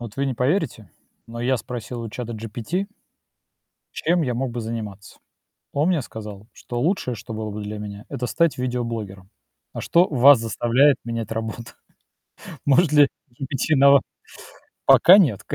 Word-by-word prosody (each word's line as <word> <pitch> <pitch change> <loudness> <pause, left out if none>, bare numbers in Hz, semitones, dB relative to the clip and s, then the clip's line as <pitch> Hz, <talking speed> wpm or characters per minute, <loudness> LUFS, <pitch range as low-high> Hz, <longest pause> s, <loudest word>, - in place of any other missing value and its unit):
Вот 115 -1 -9
вы 140 - 0
не 135 - -2
поверите, 125 - -1 0.4
но 115 0 -7
я 130 +1 +1
спросил 120 +1 -7
у 115 - -6
чата 120 +1 -6
GPT 115 - -4 1.1
чем 170 +1 +1
я 125 -4 -1
мог 130 +2 -2
бы 120 0 -5
заниматься. 110 -3 -7 0.5
Он 150 +5 +1
мне 175 -5 +2
сказал, 105 -4 -9
что 120 0 -6
лучшее, 145 - -1
что 110 +2 -8
было 110 0 -5
бы 105 +1 -6
для 105 +1 -6
меня- 105 0 -8
это 125 - -4
стать 170 -5 +1
видеоблогером. 115 -6 -4 0.4
А - - -6
что 175 +2 +3
вас 140 -1 +6
заставляет 120 +5 +2
менять 115 -2 -4
работу? 115 +1 -5 0.9
Может 145 +3 +4
ли 145 -2 +6 0.2
GPT 135 +4 -2
на 140 +1 +6 0.9
Пока 190 +4 +8
нет. 135 - +2
120 Hz, 155 wpm, -22 LUFS, 110-140 Hz, 1.1 s, Пока